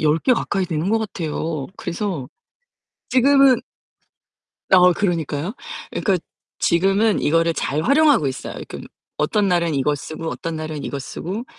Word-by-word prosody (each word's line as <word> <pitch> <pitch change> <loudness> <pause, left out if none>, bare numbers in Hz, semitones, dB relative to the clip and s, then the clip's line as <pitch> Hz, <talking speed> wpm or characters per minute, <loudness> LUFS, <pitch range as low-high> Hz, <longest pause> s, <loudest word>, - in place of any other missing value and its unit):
10 155 +1 +3
개 260 - +3
가까이 200 -5 0
되는 160 +1 -2
것 225 - +3
같아요. 160 -7 -3
그래서 175 - -4 0.8
지금은 270 0 +5 1.1
어 180 -1 +7
그러니까요. 170 -1 -2 0.4
예 - - -2
그러니까 195 -3 +2 0.4
지금은 195 +5 +2
이거를 165 +2 +2
잘 150 0 -1
활용하고 280 - +4
있어요. 130 - -4
지금 - - -8 0.3
어떤 200 +7 +1
날은 170 -3 +1
이거 145 +2 +1
쓰고 155 +3 -6
어떤 165 -1 -4
날은 155 -2 -5
이거 140 - -4
쓰고 185 - -5
170 Hz, 305 characters per minute, -21 LUFS, 155-210 Hz, 1.1 s, 어